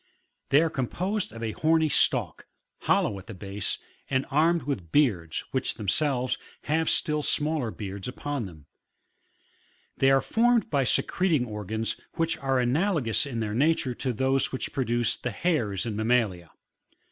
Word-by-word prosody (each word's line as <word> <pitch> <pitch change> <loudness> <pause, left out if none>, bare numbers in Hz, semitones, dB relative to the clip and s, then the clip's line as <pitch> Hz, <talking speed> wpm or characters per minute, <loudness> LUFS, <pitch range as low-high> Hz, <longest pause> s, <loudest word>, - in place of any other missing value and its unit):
They 145 +4 +5
are 165 - +1
composed 180 - -2
of 115 +1 -8
a 110 - -1
horny 160 +5 +2
stalk, 145 - +1 0.3
hollow 100 - +1
at 95 - -14
the 115 - -8
base, 100 +1 -3 0.3
and 130 0 +1
armed 165 +3 +3
with 100 - -4
beards, 95 - +2
which 130 -1 -1
them 105 -4 -7
selves, 130 -1 +1 0.2
have 160 +2 +1
still 150 -2 +1
smaller 150 -4 0
beards 100 -3 -6
upon 140 0 -3
them: 80 -6 -12 1.3
thoy 135 0 +5
are 135 - +3
formed 235 -1 +2
by 140 -3 +2
secreting 160 0 +1
organs 110 0 -3 0.2
which 165 0 +1
are 135 -1 +1
analogous 140 - +1
in 120 -4 -3
their 105 -1 -2
nature 140 0 +2
to 130 +2 -2
those 130 +3 +1
which 130 - -4
produce 120 -3 0
the 125 - -3
hairs 115 - 0
in 110 -3 -3
mammalia. 110 -6 +1
130 Hz, 155 wpm, -27 LUFS, 110-150 Hz, 1.3 s, They